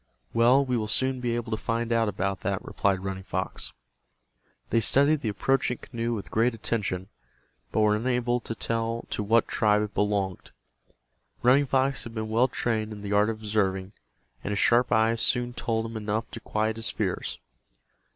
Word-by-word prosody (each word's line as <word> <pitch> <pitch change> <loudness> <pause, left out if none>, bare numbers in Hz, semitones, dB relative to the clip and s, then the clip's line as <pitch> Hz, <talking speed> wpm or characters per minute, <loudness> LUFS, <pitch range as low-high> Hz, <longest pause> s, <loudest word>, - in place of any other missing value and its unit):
"Well, 125 +4 +5
we 125 -2 0
will 110 -2 -2
soon 130 +4 +1
be 120 -1 -1
able 120 -1 -4
to 110 - 0
find 115 0 0
out 115 -2 +2
about 95 -1 -2
that," 100 -1 -2
replied 95 -2 0
Running 95 -1 -4
Fox. 95 -1 -4 1.0
They 115 - +4
studied 140 +5 +3
the 110 - -1
approaching 125 +4 +1
canoe 115 0 -4
with 100 -4 -7
great 115 +2 +2
attention, 100 -4 -2 0.6
but 110 - +1
were 105 0 +4
unable 120 +1 0
to 115 - -6
tell 115 +1 -2
to - - -1
what 115 +3 +3
tribe 105 0 +2
it 105 - -5
belonged. 100 -3 -1 0.9
Running 135 +3 +5
Fox 135 0 +1
had 115 0 -9
been 110 0 -3
well 115 +4 +3
trained 110 -4 -1
in 105 -1 -8
the 100 0 -2
art 105 +2 +4
of 110 - -2
observing, 95 -3 0 0.5
and 100 - -3
his 100 - -1
sharp 120 +4 +3
eyes 110 +1 +3
soon 120 +1 +2
told 115 -2 -1
him 115 0 -7
enough 110 +1 -2
to - - -6
quiet 110 +1 -1
his 115 0 +1
fears. 95 -4 -2
115 Hz, 180 wpm, -27 LUFS, 105-120 Hz, 1.0 s, Well